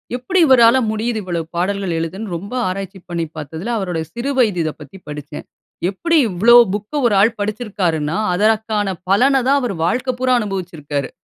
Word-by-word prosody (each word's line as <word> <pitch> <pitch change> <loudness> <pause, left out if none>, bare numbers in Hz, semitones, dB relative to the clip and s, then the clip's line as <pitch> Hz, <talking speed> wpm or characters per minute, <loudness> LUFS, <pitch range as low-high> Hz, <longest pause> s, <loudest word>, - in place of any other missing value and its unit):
எப்பிடி 255 +10 -1
இவரால 245 -2 +6
முடியுது? 220 +1 -2
இவ்ளோ 175 -2 -2
பாடல்கள் 190 -1 -1
எழுதன்னு, 185 +4 -5
ரொம்ப 200 +7 -9
ஆராய்ச்சி 190 +1 -5
பண்ணி 170 -1 -2
பார்த்ததுல, 160 - -5
அவரோட 180 -5 -2
சிறு 245 +4 -3
வயது 210 -8 +2
இத 155 - -1
பத்தி 150 +7 -11
படிச்சேன். 150 0 -8 0.4
எப்பிடி 330 - 0
இவ்ளோ 215 +6 +5 0.2
புக் 210 +8 -5
1 210 - +1
ஆள் 225 +2 +3
படிச்சிருக்காருன்னா, 195 -8 -2 0.2
அதற்கான 215 -1 +1
பலன 265 +7 +4
தான் 280 +1 +4
அவரு 235 -6 -2
வாழ்க்க 250 +6 -1
பூராம் 255 -1 +2
அனுபவிச்சிருக்காரு. 165 - -4
200 Hz, 155 wpm, -18 LUFS, 175-235 Hz, 0.4 s, இவரால